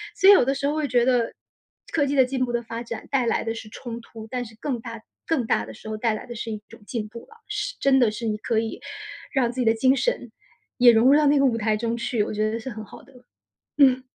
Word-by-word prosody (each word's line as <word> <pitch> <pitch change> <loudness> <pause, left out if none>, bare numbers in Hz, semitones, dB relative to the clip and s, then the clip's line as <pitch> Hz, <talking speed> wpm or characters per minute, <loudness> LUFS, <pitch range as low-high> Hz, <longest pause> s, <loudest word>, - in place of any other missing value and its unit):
所 385 - +6
以 405 - +11
有 250 - +5
的 270 - +1
时 275 - -3
候 290 - 0
会 305 -2 0
觉 245 -1 +3
得， 245 -3 +2 0.6
科 290 -3 +2
技 280 - -1
的 265 - +6
进 255 0 -1
步 240 - -4
的 240 - 0
发 230 +1 -6
展 230 -1 -7
带 265 -3 +2
来 - - +1
的 225 - -2
是 225 - -8
冲 235 0 -7
突， 225 -1 -11
但 250 -1 -2
是 220 0 -13
更 265 -5 -2
大 230 -1 -8 0.2
更 290 -8 0
大 105 - +1
的 110 - -10
时 220 - -10
候 215 - -3
带 225 0 +1
来 215 - -6
的 240 -1 -8
是 225 +1 -5
一 215 - -6
种 230 -1 -14
进 225 -4 -3
步 235 +1 -9
了， 450 - -19
是 420 +4 -3
真 270 -1 +4
的 230 -4 +4
是 220 +2 -5
你 215 -1 -1
可 220 +1 0
以 225 0 -4 0.5
让 250 -4 +2
自 255 - -7
己 - - 0
的 225 - +5
精 260 +4 +3
神， - - -1 0.5
也 245 -1 +8
融 225 +3 +5
入 290 - +7
到 305 - +3
那 285 0 +4
个 275 - +4
舞 235 -3 +2
台 220 -1 +1
中 230 +1 -1
去， 230 -2 0
我 - - -4
觉 215 +1 0
得 225 - -2
是 260 - -6
很 220 -2 -7
好 - - -13
的。 270 - -20 0.6
嗯。 260 -3 +5
240 Hz, 305 characters per minute, -24 LUFS, 225-265 Hz, 0.6 s, 以